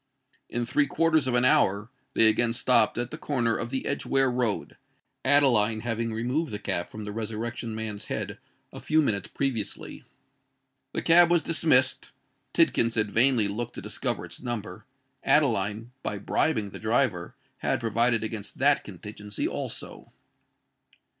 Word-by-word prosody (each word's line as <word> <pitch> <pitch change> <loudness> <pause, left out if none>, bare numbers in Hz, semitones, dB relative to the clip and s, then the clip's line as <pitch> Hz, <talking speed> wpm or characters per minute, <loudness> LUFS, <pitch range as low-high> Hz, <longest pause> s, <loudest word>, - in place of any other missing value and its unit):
In 120 0 -2
three 140 +4 +1
quarters 160 -4 +2
of 125 - +1
an 125 +1 +3
hour 105 -1 +3 0.2
they 115 - +6
again 115 +2 +2
stopped 125 0 +3
at 120 - -3
the 155 - -7
corner 120 -7 0
of 120 - -3
the 130 +1 -3
Edgeware 135 -2 +1
Road, 120 -4 -2 0.5
Adeline 120 -6 +3
having 115 0 -2
removed 125 +7 -2
the 105 - -3
cap 85 -3 -2
from 105 -1 -8
the 105 - -5
Resurrection 115 +1 -4
Man's 110 -2 -5
head - - -4 0.3
a - - -8
few 155 0 +2
minutes 100 -8 0
previously. 125 -7 -4 0.9
The - - -2
cab 170 +1 +6
was 175 -3 +3
dismissed:—Tidkins 130 -6 +1
had 105 -2 +1
vainly 115 -2 +3
looked 110 +4 -4
to - - -6
discover - - -3
its - - -10
number. 110 -5 -5 0.4
Adeline, 115 -6 +1
by 105 - -3
bribing 105 0 0
the - - -9
driver, 110 -6 0 0.2
had - - 0
provided 115 +1 +1
against 110 -2 -6
that 140 +1 +3
contingency 105 +1 -6
also! - - -5
115 Hz, 145 wpm, -27 LUFS, 105-135 Hz, 0.9 s, they